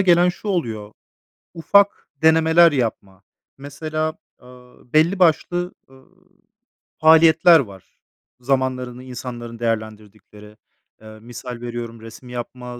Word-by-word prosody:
gelen 180 -1 +4
şu 200 +4 -6
oluyor: 110 - -3 0.6
Ufak 200 +5 +2
denemeler 160 +1 +5
yapma. 100 -7 -4 0.3
Mesela, 155 +3 -4 0.3
ııı, 125 0 -19
belli 170 +5 +3
başlı, 175 +1 +1 0.2
ııı, 130 0 -20 0.9
faaliyetler 160 +1 +6
var, 100 -7 -9 0.4
zamanlarını 125 -1 -2
insanların 120 -2 -8
değerlendirdikleri. 110 -2 -6 0.4
Eee, 110 0 -13
misal 120 +1 -9
veriyorum, 120 -1 -7
resim 115 +3 -13
yapma, 125 0 -8
125 Hz, 100 wpm, -20 LUFS, 115-160 Hz, 0.9 s, faaliyetler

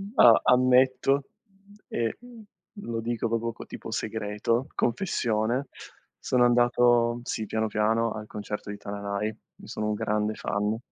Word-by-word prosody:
A 120 - +7
ammetto 130 +2 +4 0.6
e 115 -1 -2 0.7
lo 115 - -4
dico 115 0 -2
proprio 115 +1 -1
co - - -10
tipo - - -9
segreto, 110 +3 -1
confessione, 120 - 0 0.5
sono 125 -1 +2
andato, 120 -1 +3
sì, 110 -2 -3
piano, 110 +1 -1
piano, 110 +2 +1
al 105 0 -7
concerto 105 0 -6
di 105 - -5
Tananai; 100 0 -4
ne 110 - -15
sono 105 - -3
un 105 - 0
grande 105 +1 -1
fan. 105 +2 -1
115 Hz, 130 wpm, -27 LUFS, 105-120 Hz, 0.7 s, A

